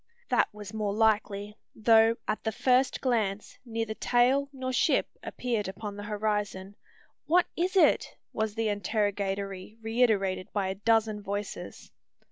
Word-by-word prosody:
That - - +2
was 210 -1 -9
more 210 -2 -2
likely: 210 -1 +1 0.2
though, 225 +1 +5
at 215 - -2
the 220 - 0
first 255 +4 +2
glance, 215 -6 -1
neither 225 -2 -3
tail 255 +5 +2
nor 260 -1 -4
ship - - +2
appeared 230 -5 -2
upon 200 +2 -6
the 205 - -7
horizon, 205 -2 -2 0.5
"What 350 +3 +4
is 360 +3 -1
it?" 380 - +3 0.2
was 220 -1 -2
the 225 -1 0
interrogatory 200 -1 -2
reiterated 220 -5 +1
by 195 -2 0
a - - -1
dozen 215 0 +1
voices. 205 0 -6
215 Hz, 135 wpm, -28 LUFS, 205-230 Hz, 0.5 s, though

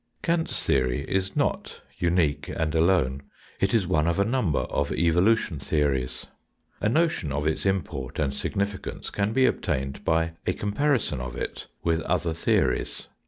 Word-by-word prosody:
Kant's 170 -1 0
theory 65 0 +1
is 95 0 -1
not - - -1 0.2
unique 85 -5 +1
and 80 -1 -1
alone. 80 -5 +2 0.4
It 95 - +2
is 110 -5 +2
one 80 -3 +2
of 85 - +1
a 100 - +3
number 110 - +1
of 70 0 -1
evolution 90 +1 +2
theories. 65 -4 -1 0.5
A 105 - +1
notion 155 - +1
of 75 +1 -1
its 80 +5 0
import 70 -9 -2
and 70 -3 0
significance 100 +7 -3
can 100 +1 0
be 130 +3 +4
obtained 70 - -1
by 80 0 +1
a 90 - +3
comparison 110 - 0
of 65 -1 -5
it - - -5 0.2
with 80 -1 +1
other 85 -1 0
theories. 85 - 0
85 Hz, 155 wpm, -26 LUFS, 75-100 Hz, 0.5 s, be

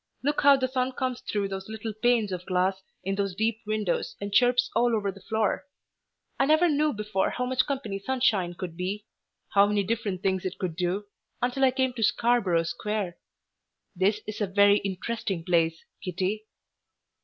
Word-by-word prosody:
Look 290 +2 +1
how 280 -1 +7
the 260 -1 0
sun 255 0 -1
comes 255 -1 -2
through 200 -2 -2
those 195 +1 -6
little 220 0 -5
panes 225 -1 +2
of 180 -1 -5
glass 190 +1 +1 0.2
in 195 - -1
those 195 -2 -1
deep 220 +2 0
windows 215 -4 -1
and 200 0 -5
chirps 245 +2 +4
all 240 -1 +3
over 200 -2 -1
the 195 0 -14
floor. 220 +7 -1 0.7
I 270 - +3
never 315 +3 +5
knew 300 0 +2
before 210 -3 -1
how 250 - -2
much 255 0 +1
company 245 -9 -3
sunshine 200 -6 +1
could 175 -2 -6
be; 190 +4 -3 0.4
how 200 0 +5
many 205 -1 +1
different 205 -2 -2
things 190 -2 +1
it 185 0 -4
could 180 -4 -3
do, 180 +4 -1 0.3
until 250 +2 0
I 265 - +7
came 260 0 0
to 240 - -6
Scarborough 215 -7 +3
Square. 195 +1 -3 0.8
This 200 +4 +2
is 215 0 -6
a 205 - +1
very 200 +1 +5
interesting 195 -2 -3
place, 165 -2 +1 0.2
Kitty." 190 +3 -2
210 Hz, 180 wpm, -27 LUFS, 190-245 Hz, 0.8 s, how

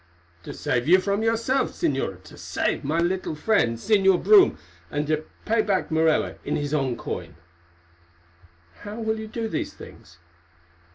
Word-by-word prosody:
"To - - -8
save 120 +2 -1
you 180 +3 +7
from 200 +2 -1
yourself, 230 +4 +1
Señora, 95 -10 -2
to - - -14
save - - -2
my 150 +4 -1
friend 175 - 0
the 210 - +2
Señor 195 -2 +3
Brome, 410 -3 +6 0.3
and 145 0 -2
to 155 +1 -1 0.2
pay 225 +1 +2
back 195 -5 -1
Morella 160 0 +2
in - - -2
his 145 0 -3
own 135 -5 0
coin." 85 -2 -6 1.4
"How 205 +1 -8
will 220 -1 -1
you 220 - -6
do 225 +1 -4
these - - -4
things?" 85 +2 -14
180 Hz, 155 wpm, -24 LUFS, 145-220 Hz, 1.4 s, you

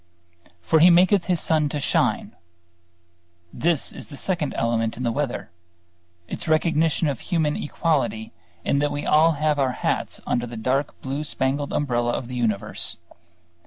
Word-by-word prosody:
"For 160 - +3
He 170 +3 +8
maketh 180 +2 +5
His 180 -2 +1
sun 155 -2 +1
to 145 - -3
shine...." - - 0 1.2
This 165 -3 0
is - - -9
the 145 - -10
second 170 -5 -1
element 115 -1 0
in 125 - -4
the 120 - +1
weather; 130 -6 -3 0.8
its - - -5
recognition 160 0 +2
of 140 -4 -2
human 160 -4 0
equality 145 - -1 0.3
in 140 - +2
that 145 0 +1
we 145 0 -3
all 160 +2 +5
have 150 0 0
our 130 -2 +1
hats - - -2
under 120 0 -1
the 120 -1 -8
dark 135 +6 -1
blue 135 +3 -3
spangled 140 0 -1
umbrella 120 -4 0
of 120 - -3
the 125 - -6
universe. 110 -5 -2
145 Hz, 160 wpm, -23 LUFS, 125-160 Hz, 1.2 s, He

